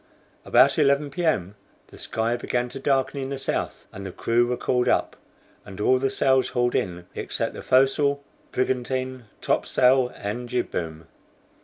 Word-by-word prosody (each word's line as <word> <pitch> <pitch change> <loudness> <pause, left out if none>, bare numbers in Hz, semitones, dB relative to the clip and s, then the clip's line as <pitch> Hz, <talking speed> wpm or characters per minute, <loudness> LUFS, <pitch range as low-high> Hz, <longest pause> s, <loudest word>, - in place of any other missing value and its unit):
About 135 +6 +5
11 140 0 +2
P. 175 +6 -4
M. 100 - +1 0.4
the - - -14
sky 115 +1 -1
began 120 0 -2
to 135 +2 -7
darken 135 0 0
in 135 - -4
the 140 - -3
south, 135 - -3
and 100 - -8
the 95 - -6
crew 120 +6 +1
were 125 0 -1
called 125 -1 0
up, - - +1 0.5
and 95 0 -11
all 130 +5 +3
the 135 +1 +1
sails 130 -1 +2
hauled 120 0 0
in, 90 -2 -2
except - - -3
the - - -8
foresail, 140 +2 +3 0.3
brigantine, 130 0 -2 0.2
top - - 0
sail, 125 0 +3
and 120 +5 -5
jib 125 -1 -1
boom. 80 -1 -4
125 Hz, 170 wpm, -24 LUFS, 120-135 Hz, 0.5 s, About